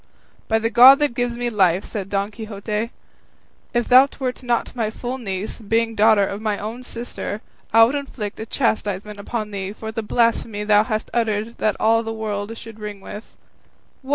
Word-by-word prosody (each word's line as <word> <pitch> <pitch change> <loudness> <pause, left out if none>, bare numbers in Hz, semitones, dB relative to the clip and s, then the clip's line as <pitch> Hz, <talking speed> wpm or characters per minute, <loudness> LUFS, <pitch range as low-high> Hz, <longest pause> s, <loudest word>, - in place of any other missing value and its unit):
"By 220 - +2
the 225 +1 -1
God 255 +4 +9
that 295 -4 +1
gives 245 0 -1
me 240 0 -2
life," 190 -3 +2
said 195 -3 -5
Don 200 +1 -1
Quixote, 215 0 -4 0.8
"if 240 -1 0
thou 255 +2 +7
wert 255 -1 -3
not 240 -1 -1
my 225 -3 0
full 245 +4 -5
niece, 195 -2 -4
being 225 +1 0
daughter 215 -1 +5
of 200 +2 -5
my 215 -2 -1
own 225 +4 -6
sister, 235 -3 -5 0.3
I 225 +1 +7
would 235 +4 +3
inflict 270 -8 -5
a 220 - -5
chastisement 210 -4 -1
upon 215 +1 -4
thee 195 0 -4
for 220 +1 -7
the 225 - -3
blasphemy 225 -1 0
thou 210 0 +4
hast 215 -2 -3
uttered 225 -1 -1
that 215 - +1
all 225 +1 +4
the 225 -1 -5
world 215 0 -4
should 225 -1 -11
ring 210 -1 -6
with. 205 +3 -10 0.7
What! 265 - -14
220 Hz, 185 wpm, -22 LUFS, 210-235 Hz, 0.8 s, God